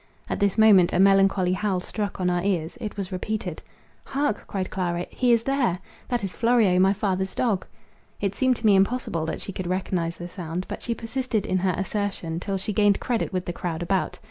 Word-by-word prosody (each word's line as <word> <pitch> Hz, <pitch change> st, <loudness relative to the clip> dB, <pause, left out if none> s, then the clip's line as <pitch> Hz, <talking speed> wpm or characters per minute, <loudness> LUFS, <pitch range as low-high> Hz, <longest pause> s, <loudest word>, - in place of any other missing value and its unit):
At -, -, -3 dB
this 200 Hz, -1 st, +1 dB
moment 205 Hz, -5 st, +6 dB
a 175 Hz, -, +2 dB
melancholy 195 Hz, -1 st, +4 dB
howl 190 Hz, -1 st, 0 dB
struck 205 Hz, +2 st, -4 dB
on 180 Hz, -, +1 dB
our 175 Hz, 0 st, +1 dB
ears; 175 Hz, -4 st, -1 dB
it 210 Hz, -2 st, -5 dB
was 195 Hz, -1 st, -4 dB
repeated; 210 Hz, +4 st, -3 dB, 0.4 s
"Hark!" 275 Hz, -5 st, -1 dB
cried 190 Hz, -2 st, -3 dB
Clara, 175 Hz, -2 st, -1 dB
"he 250 Hz, -2 st, +2 dB
is 230 Hz, -1 st, +4 dB
there; 260 Hz, -9 st, +1 dB, 0.3 s
that 240 Hz, -3 st, -1 dB
is 190 Hz, -3 st, -3 dB
Florio, 225 Hz, -4 st, +3 dB
my 190 Hz, +1 st, +5 dB
father's 190 Hz, -2 st, -1 dB
dog." 215 Hz, -7 st, 0 dB, 0.5 s
It 200 Hz, -1 st, -1 dB
seemed 260 Hz, +3 st, +2 dB
to 230 Hz, -, -7 dB
me 205 Hz, -2 st, +6 dB
impossible 195 Hz, -5 st, +1 dB
that -, -, -3 dB
she -, -, -5 dB
could 185 Hz, -1 st, -5 dB
recognise 180 Hz, -2 st, -1 dB
the 175 Hz, -, -6 dB
sound, 175 Hz, 0 st, -5 dB
but -, -, -6 dB
she 235 Hz, -, -2 dB
persisted 230 Hz, -2 st, -2 dB
in 185 Hz, -, 0 dB
her 185 Hz, -1 st, +1 dB
assertion 190 Hz, -4 st, -2 dB
till 195 Hz, +2 st, -2 dB
she 200 Hz, +3 st, -3 dB
gained 205 Hz, 0 st, +3 dB
credit 240 Hz, -3 st, -1 dB
with 185 Hz, -1 st, -2 dB
the 175 Hz, -, -3 dB
crowd 170 Hz, -1 st, -3 dB
about. 190 Hz, +2 st, -1 dB
195 Hz, 210 wpm, -25 LUFS, 180-215 Hz, 0.5 s, moment